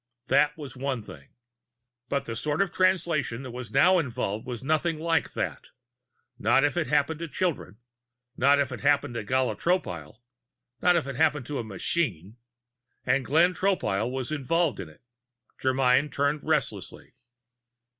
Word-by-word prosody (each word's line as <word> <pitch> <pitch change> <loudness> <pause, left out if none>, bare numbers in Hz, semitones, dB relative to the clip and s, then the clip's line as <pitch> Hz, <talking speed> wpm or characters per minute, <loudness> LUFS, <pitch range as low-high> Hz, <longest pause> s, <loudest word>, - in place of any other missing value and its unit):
That 145 +3 +3
was 145 -5 -8
one 130 -3 -3
thing. 70 -8 -13 0.8
But 140 - -1
the 115 - -5
sort 150 +5 -2
of 195 - -6
Translation 170 -9 +1
that 130 - -7
was 125 -1 -7
now 180 +7 +5
involved 120 -7 -3
was 125 -1 -5
nothing 155 +3 0
like 165 0 0
that - - -3 0.7
not 135 +1 +3
if 145 - +1
it 175 -3 0
happened 150 +1 +1
to 170 - -4
children; 150 - -3 0.6
not 140 +2 +4
if 140 -2 0
it 130 - -5
happened 145 -2 +2
to 115 -2 -4
Gala 130 +4 0
Tropile; 90 - -2 0.6
not 180 0 +4
if 165 - +1
it 135 -2 -6
happened 150 -4 +2
to 145 +1 -4
a - - -3
machine. 105 - -2 0.7
And 130 +2 +2
Glenn 165 +8 +3
Tropile 150 - 0
was 130 +1 -4
involved 155 +3 0
in 85 - -6
it. 80 - -20 0.6
Germyn 130 +2 +2
turned 145 +2 0
restlessly. 130 - -2
140 Hz, 155 wpm, -27 LUFS, 120-155 Hz, 0.8 s, now